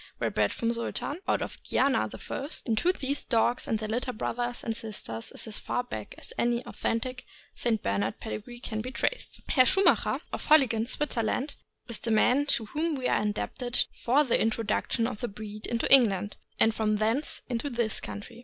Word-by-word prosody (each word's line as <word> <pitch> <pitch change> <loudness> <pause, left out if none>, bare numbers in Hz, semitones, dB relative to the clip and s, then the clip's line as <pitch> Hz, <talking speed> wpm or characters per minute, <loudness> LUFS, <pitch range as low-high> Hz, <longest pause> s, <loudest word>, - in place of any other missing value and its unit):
were - - 0
bred - - +2
from 230 0 0
Sultan, 240 +6 -1
out - - +2
of - - -7
Diana - - +2
I., 275 - -5 0.2
and 230 - +1
to 355 - +4
these 280 -5 -2
dogs 235 0 +1
and 220 - +1
their 215 0 -4
litter 245 +4 -1
brothers 240 +1 -3
and 225 - -2
sisters 160 - -6
is - - -6
as 220 -2 -4
far 245 - -1
back 110 - -7
as - - -8
any 240 0 +1
authentic 250 +2 -2 0.3
St. 225 -3 0
Bernard 100 +3 -1
pedigree 230 +2 -6
can 220 -4 -3
be 250 - -5
traced. - - -1
Herr 255 -3 +5
Schumacher, 390 +1 +4
of - - -4
Holligen, 240 -7 +5
Switzerland, 260 0 -1 0.3
is 235 -3 -2
the 230 - -2
man 250 +6 +4
to 230 - +3
whom 310 +7 -1
we 260 -2 -1
are - - +2
indebted 225 +4 0
for 270 +5 +3
the 255 - +2
introduction 225 +1 +1
of 230 -3 -3
the 240 - -1
breed 210 0 -7
into 235 -1 0
England, 210 -6 +5 0.2
and 225 - +5
from 215 -1 +1
thence 225 +8 -1
into 250 +3 -2
this 235 -4 0
country. 225 +3 -8
235 Hz, 190 wpm, -28 LUFS, 220-255 Hz, 0.3 s, Herr